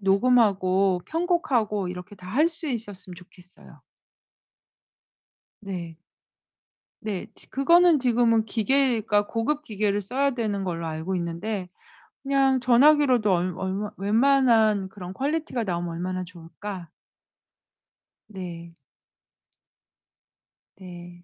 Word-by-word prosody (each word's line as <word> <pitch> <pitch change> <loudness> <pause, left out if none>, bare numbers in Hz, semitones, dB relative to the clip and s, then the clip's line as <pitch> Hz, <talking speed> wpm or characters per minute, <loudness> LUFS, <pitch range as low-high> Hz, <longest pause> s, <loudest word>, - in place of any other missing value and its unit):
녹음하고 195 -3 +3
편곡하고 265 - 0
이렇게 180 +3 -8
다 180 -2 -14
할 285 - +3
수 330 -1 -5
있었음 205 -7 -5
좋겠어요. 180 0 -17 1.8
네. 175 -5 -6 1.1
네. 210 -4 -4
지 - - -11
그거는 335 +3 +4
지금은 235 -3 +2
기계가 220 -2 +1
고급 280 +6 -1
기계를 205 -4 -1
써야 275 +8 0
되는 215 -5 -2
걸로 170 -3 -3
알고 160 +4 -3
있는데 180 +3 -4 0.5
그냥 270 -1 +2
전화기로도 255 -3 +4
얼 180 +1 0
얼마 190 +2 -3
웬만한 220 -2 +3
그런 185 -2 -9
퀄리티가 280 0 -2
나오면 175 -3 -3
얼마나 185 +2 -3
좋을까? 175 +1 -9 1.4
네. 170 -4 -9 2.0
네. 175 -1 -12
205 Hz, 225 characters per minute, -25 LUFS, 185-250 Hz, 2.0 s, 그거는